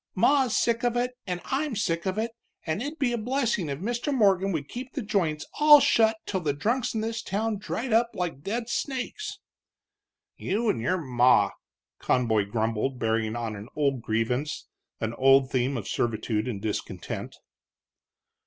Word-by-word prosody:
Ma's 270 -5 +3
sick 235 0 +1
of 240 0 +1
it, 245 +1 0 0.2
and 180 -1 -3
I'm 275 -1 -1
sick 170 -4 -1
of 190 +2 -1
it, 225 +2 -1 0.3
and 160 +6 -1
it'd 295 +5 -4
be 260 -5 +1
a 235 - -1
blessin' 230 - 0
if 140 - -3
Mr. 240 - -2
Morgan 195 -6 +3
would 150 -5 -3
keep 250 +1 -7
the 275 - -3
joints 165 -8 0
all 295 0 +9
shut 220 -4 +4
till 190 - -1
the 150 -5 -1
drunks 230 - 0
in 220 - 0
this 225 +1 -2
town 215 +2 -1
dried 225 +4 -3
up 230 +1 +4
like 170 -6 -3
dead 230 +8 -3
snakes!" 270 - -3 1.0
"You, 215 +4 -1
and 115 - 0
your 185 +10 +1
ma!" 125 - +3 0.5
Conboy 110 -5 +2
grumbled, 110 +4 -1
bearing 110 -1 0
on 115 -2 -3
an 100 +2 -8
old 140 -4 +1
grievance, 125 +7 -1 0.3
an 110 +1 -2
old 135 +1 +4
theme 130 +1 0
of 110 - -5
servitude 110 -1 -1
and 110 -6 -3
discontent. 105 0 -4
180 Hz, 170 wpm, -27 LUFS, -, 1.0 s, all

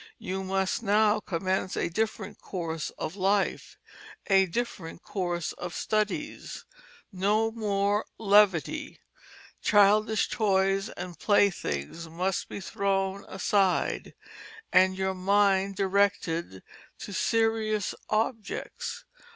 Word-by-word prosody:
You 190 +1 -4
must 190 +1 -1
now 210 0 +3
commence 185 0 -2
a - - 0
different 210 +2 -3
course 165 -4 -4
of 160 - -4
life, 195 0 0 0.5
a 195 -1 +4
different 180 -5 -4
course 175 -3 -2
of 180 -1 -7
studies. 215 +8 -2 0.5
No 210 +4 +1
more 205 -2 0
levity. 210 - +2 0.6
Childish 210 +1 +4
toys 195 -1 +1
and 175 -3 -8
playthings 165 - 0
must 180 +3 -2
be - - -6
thrown 195 0 -1
aside, 190 -1 0 0.6
and 185 0 +5
your 190 0 0
mind 195 +1 +2
directed 190 - 0 0.3
to 200 - -8
serious 220 0 +1 0.2
objects. 220 0 -3
195 Hz, 100 wpm, -28 LUFS, 185-210 Hz, 0.6 s, and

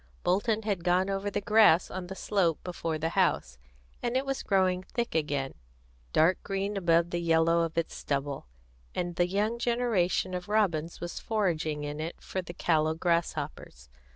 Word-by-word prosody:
Bolton 210 +4 +1
had 200 -5 -1
gone 180 +2 +2
over 195 +1 -1
the 205 - -1
grass 210 -5 +5
on 185 -1 -5
the 190 - -6
slope 185 -6 +1
before 165 -3 -3
the 160 +1 -1
house, 60 - +1 0.4
and 240 +1 0
it 265 - -1
was 270 -1 -2
growing 185 -2 +2
thick 235 +5 -3
again, 145 -4 -1 0.6
dark 170 +4 +3
green 195 +1 -2
above 170 -2 +2
the 175 - -1
yellow 165 0 +3
of 165 0 -2
its 165 - -1
stubble, 140 - -3 0.5
and 175 -1 -2
the 175 0 +2
young 210 +5 0
generation 230 -7 +1
of 180 +1 -5
robins 170 -7 0
was 175 0 -5
foraging 160 -8 -1
in 145 +1 -4
it 160 +2 -5
for 190 - -4
the 175 - -8
callow 155 -2 +2
grasshoppers. 155 - -2
175 Hz, 170 wpm, -29 LUFS, 160-200 Hz, 0.6 s, grass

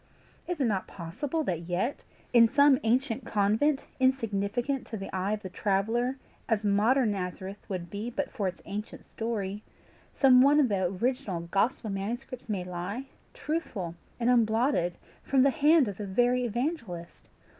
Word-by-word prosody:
Is 355 -3 -3
it 270 - +2
not 200 -5 0
possible 265 - -3
that 170 - -3
yet, 180 +10 -1 0.3
in 235 -1 +8
some 280 +1 +5
ancient 245 +2 +1
convent, 225 +7 +1 0.2
insignificant 245 0 0
to 220 - -5
the 195 -1 -6
eye 190 +3 0
of 215 - -4
the 185 - -5
traveller 225 +7 0 0.3
as 220 -2 +1
modern 215 +4 +3
Nazareth 190 +1 -5
would 180 -3 -4
be 210 +4 -4
but 275 +4 -3
for 210 -7 -2
its 185 - -6
ancient 210 +2 -6
story, 210 -3 -3 0.5
some 255 -2 +6
one 285 +3 +6
of 270 -5 +4
the 190 -3 +1
original 195 -1 -1
gospel 200 +5 0
manuscripts 235 +6 -5
may 195 -4 -1
lie, 180 +9 -5 0.3
truthful 235 - -3 0.3
and 240 +1 +3
unblotted 225 -5 +2 0.3
from 265 -2 +3
the 275 - +5
hand 305 -1 +4
of 200 - -5
the 210 - -5
very 245 +5 +2
evangelist? 230 - -4
225 Hz, 155 wpm, -29 LUFS, 195-260 Hz, 0.5 s, in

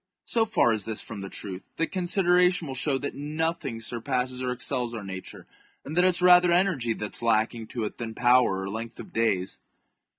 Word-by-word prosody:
So 225 -1 +1
far 160 - +3
is 105 -3 -3
this 110 -1 -2
from 105 -3 -8
the 95 - -6
truth, 95 -2 -8
that 165 - -1
consideration 180 -1 +2
will 135 - -4
show 135 +1 0
that 140 +1 -4
nothing 150 -3 -3
surpasses 125 +3 -2
or 125 -1 -1
excels 125 -1 -3
our 110 - -6
nature, 95 -1 -8 0.4
and 150 - -6
that 180 - +4
it - - +5
is 180 - +1
rather 180 -1 +7
energy 170 -10 +2
that 105 -1 -5
is - - -1
lacking 115 0 +1
to 115 0 -4
it 105 - -5
than 115 -2 -5
power 120 -6 +4
or - - -4
length 115 +2 -6
of - - -10
days. 100 -5 0
125 Hz, 205 wpm, -26 LUFS, 110-165 Hz, 0.4 s, rather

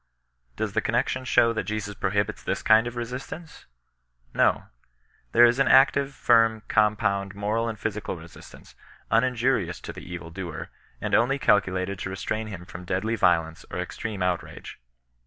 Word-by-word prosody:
Does - - -3
the - - +1
connexion 130 - -1
show 115 -2 +4
that 110 - -3
Jesus 105 -1 -3
prohibits 100 +1 -1
this - - -3
kind 110 +2 +5
of 120 - -6
resistance? 130 +7 -7 0.7
No. - - +3 0.7
There 120 +1 +7
is 120 +2 +3
an 135 - +3
actiye, 135 +1 +5
firm, 115 -4 +3
compound, 100 -2 +1
moral 110 +3 -1
and 110 - -5
physical 105 -4 -4
resistance, 80 +1 -14 0.4
uninjurious 115 -6 +1
to - - -7
the - - -10
evil 85 -1 -7
doer, 85 -2 -6 0.3
and - - -4
on^ 135 +4 +3
calculated 95 -4 +1
to - - -4
re 95 - -5
strain 110 +3 -3
him 95 -4 -8
from 90 0 -9
deadly 95 +5 -1
riolence 80 -5 +1
or - - -5
extreme 105 -4 -4
outrage. 90 -1 -4
110 Hz, 155 wpm, -26 LUFS, 95-120 Hz, 0.7 s, There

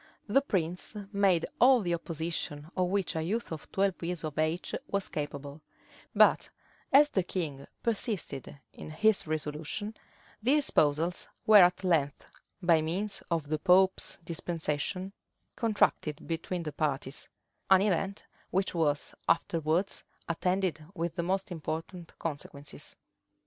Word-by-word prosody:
The 225 +6 +3
prince 180 - -2 0.2
made 195 -4 +3
all 255 0 +7
the 175 -3 -1
opposition 165 -2 -3
of 180 -1 +1
which 195 -3 0
a 160 - 0
youth 215 +8 -2
of 160 -2 -7
twelve 195 -2 +1
years 170 -1 -3
of 155 -1 -4
age 155 +3 0
was 200 -1 -1
capable; 145 0 -5 0.5
but - - +5 0.4
as 290 +2 +7
the 190 - +2
king 155 -7 -4 0.2
persisted 200 - -1
in - - -9
his 210 +4 +2
resolution, 155 +7 -3 0.5
the 255 +6 +4
espousals 165 - +2 0.2
were 215 -1 +8
at 180 +2 +4
length, 155 -6 +1 0.4
by 170 -2 +5
means 190 +6 -1
of 160 -4 -1
the 155 0 0
pope's 190 +2 +3
dispensation, 170 +3 -2 0.4
contracted 205 - +1
between 170 +1 -3
the 150 -2 -5
parties; 145 -2 -2 0.4
an 190 0 +7
event 195 0 -1 0.2
which 190 +1 0
was 150 -4 +1 0.2
afterwards 165 +2 +1 0.2
attended 180 -1 0
with 170 -2 -2
the 175 - 0
most 190 +2 -1
important 165 +1 -5
consequences. 145 -2 -5
170 Hz, 130 wpm, -30 LUFS, 155-195 Hz, 0.5 s, were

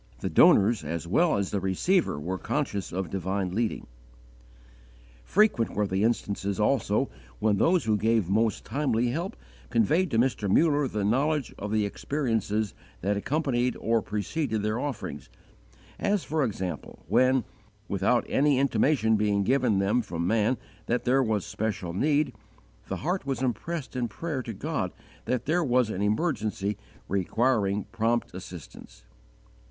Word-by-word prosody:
The - - -2
donors 105 -2 +5
as 80 +2 -4
well 155 - +3
as 100 -2 -2
the 100 - 0
receiver 95 - +1
were 90 +5 -3
conscious 120 -10 -2
of 95 0 -3
divine 95 0 -2
leading. 115 +2 -1 1.4
Frequent 200 - +2
were 105 - +1
the 95 +1 0
instances 100 -3 -1
also 110 +2 +1 0.3
when 105 -1 +2
those 175 - +3
who 110 -1 +2
gave 110 -2 +2
most 110 +3 +1
timely 125 -5 0
help 170 +9 -3 0.3
conveyed 155 - +2
to 115 - 0
Mr. 120 -4 +1
Muller 145 - +3
the 105 -4 -2
knowledge 140 +5 +1
of 105 +1 -4
the 110 -1 +2
experiences 110 -4 -1 0.3
that 100 +3 0
accompanied 125 +1 0
or 115 0 +1
preceded 110 +2 -2
their 105 +2 0
offerings; 140 - -5 0.7
as, 205 -2 +1
for 155 -1 0
example, 95 - -4
when, 130 -1 +3 0.4
without 100 +5 +1
any 145 -1 +3
intimation 120 -3 +2
being 105 -1 +1
given 125 -2 +2
them 100 +5 +2
from 85 -6 -4
man 110 +5 +2 0.3
that 120 +1 0
there 130 +2 +4
was 110 -6 0
special 100 -4 -3
need, 145 - +1 0.5
the - - -3
heart 180 -3 -1
was 135 -2 -1
impressed 135 +5 -3
in 125 -2 0
prayer 145 +4 -4
to 115 -2 -6
God 95 - -2 0.3
that 125 -1 -1
there 170 +4 +2
was 125 -5 +2
an 95 - -3
emergency 105 - 0 0.3
requiring 100 +1 +1
prompt 115 +1 0
assistance. 90 -8 -10
115 Hz, 145 wpm, -27 LUFS, 100-135 Hz, 1.4 s, donors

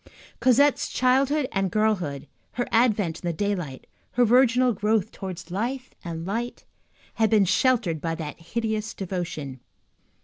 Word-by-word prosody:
Cosette's 275 +3 +3
childhood 270 +3 +2
and 195 -1 0
girlhood, 185 -10 0 0.3
her 245 0 -1
advent 215 -8 +2
in 175 - -5
the - - +1
daylight, 175 -8 -3 0.3
her 245 0 +4
virginal 250 +1 +4
growth 215 +1 0
towards 180 -3 -7
life 250 +7 -3
and 165 -2 -5
light, 230 +5 -4 0.5
had 220 -2 +2
been 210 -3 +4
sheltered 200 - +2
by 165 -1 -2
that 155 -1 -6
hideous 220 +5 -3
devotion. 170 -8 -4
210 Hz, 135 wpm, -25 LUFS, 175-245 Hz, 0.5 s, her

